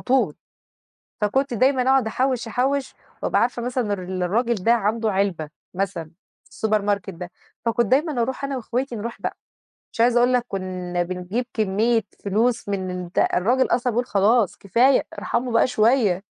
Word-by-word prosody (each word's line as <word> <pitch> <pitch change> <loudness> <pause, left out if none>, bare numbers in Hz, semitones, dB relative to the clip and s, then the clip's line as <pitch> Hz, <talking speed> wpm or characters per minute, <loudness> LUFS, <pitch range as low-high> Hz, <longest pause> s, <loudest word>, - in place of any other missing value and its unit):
طول. 260 +1 +1 0.9
فكنت 265 +5 +1
دايمًا 260 +3 +3
أقعد 260 -2 +3
أحوّش 255 +1 -1
أحوّش، 265 +5 -1 0.3
وأبقى - - +2
عارفة 240 0 0
مثلًا 250 +1 -1
إن 210 - -3
ر 190 -3 -2 0.2
الراجل 235 +6 +1
ده 225 +4 +2
عنده 220 0 0
علبة، 190 -6 -1 0.2
مثلًا، 175 -4 -3 0.4
السوبر 215 -1 0
ماركت 200 -1 -1
ده. 175 +1 -8 0.3
فكنت 235 +1 +2
دايمًا 270 - +1
أروح 265 +3 -2
أنا 275 0 -2
واخواتي 245 +1 -3
نروح 230 +2 -6
بقى. - - -3 0.6
مش 230 - -1
عايزة 240 0 +4
أقول 245 +1 +3
لك 245 -1 +2
كنا 185 -3 -3
بنجيب 185 +7 -3
كمية 220 +2 +1 0.2
فلوس 220 +3 0
من 190 -2 -2
الد 180 -1 -3
الراجل 245 +8 +2
أصلًا 245 +1 +1
بيقول: 240 +2 0
"خلاص 210 0 +2
كفاية، 245 +7 +3
ارحموا 245 0 -2
بقى 230 - +4
شوية". 215 -5 +2
230 Hz, 160 wpm, -23 LUFS, 195-250 Hz, 0.9 s, عايزة